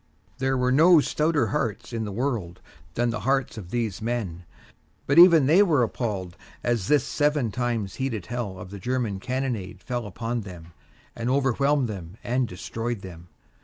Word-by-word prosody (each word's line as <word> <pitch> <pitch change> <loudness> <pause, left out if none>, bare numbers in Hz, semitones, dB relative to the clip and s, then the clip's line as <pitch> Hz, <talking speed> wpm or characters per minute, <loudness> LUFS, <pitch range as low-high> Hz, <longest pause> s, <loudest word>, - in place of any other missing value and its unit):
There 135 0 +1
were 125 0 +1
no 165 +5 +7
stouter 155 +1 +1
hearts 120 -4 -2
in 115 -1 -2
the - - -4
whole 100 - -7
world 115 -10 -2 0.4
than 120 0 +1
the 115 - -3
hearts 135 -1 0
of 100 -6 -8
these 110 -5 -2
men; 105 -7 -3 0.6
but 140 +4 +4
even 170 -5 +8
they 165 +8 +6
were 155 -10 +4
appalled 100 -6 -3 0.3
as 115 -5 0
this 150 -1 +4
seven 145 -6 0
times 115 -5 -2
heated 115 -8 -3
hell 115 -4 -4
of 90 0 -9
the 100 - -7
German 120 -2 -2
cannonade 125 -4 -3
fell 120 -3 -4
upon 115 +4 -3
them 85 -4 -11 0.4
and 115 +1 -2
overwhelmed 140 +1 +2
them 95 -3 -7
and 125 +1 0
destroyed 115 +4 -4
them. 90 -2 -10
120 Hz, 170 wpm, -25 LUFS, 100-135 Hz, 0.6 s, even